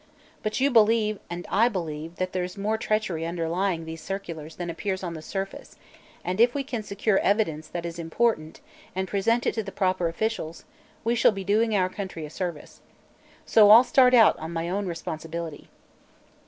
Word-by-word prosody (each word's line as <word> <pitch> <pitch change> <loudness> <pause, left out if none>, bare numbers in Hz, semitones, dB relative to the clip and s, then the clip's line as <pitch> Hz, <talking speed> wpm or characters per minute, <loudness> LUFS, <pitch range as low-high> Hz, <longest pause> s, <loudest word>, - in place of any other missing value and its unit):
But 215 +2 -2
you 275 +2 +3
believe, 215 -2 +4
and 175 0 -5
I 230 +5 +4
believe, 165 -5 -5
that 185 0 -3
there's 180 +1 -3
more 210 +2 0
treachery 215 -7 -1
underlying 170 +1 -1
these 160 0 -7
circulars 170 -5 -6
than 175 - -5
appears 190 +3 -3
on 175 -2 -3
the 160 - -7
surface, 195 +4 -6 0.5
and 185 +4 0
if 240 +2 +4
we 280 - -1
can 250 -4 -4
secure 205 0 0
evidence 165 -7 0
that 170 +1 -5
is 170 0 -6
important, 165 -1 -1 0.3
and 190 0 -1
present 230 +5 +1
it - - +1
to 225 - -1
the 200 -2 -7
proper 185 -3 0
officials, 170 -2 -3 0.4
we 230 +1 +1
shall 235 - +5
be 195 -2 -5
doing 215 +3 +2
our 185 -2 +3
country 185 -4 -6
a 150 - -10
service. 175 -4 -6 0.6
So 210 -2 +6
I'll 225 +4 +10
start 255 -1 +5
out 225 -3 +7
on 160 +1 -6
my 165 0 -3
own 200 +1 -1
responsibility." 165 -1 -6
190 Hz, 180 wpm, -26 LUFS, 165-215 Hz, 0.6 s, I'll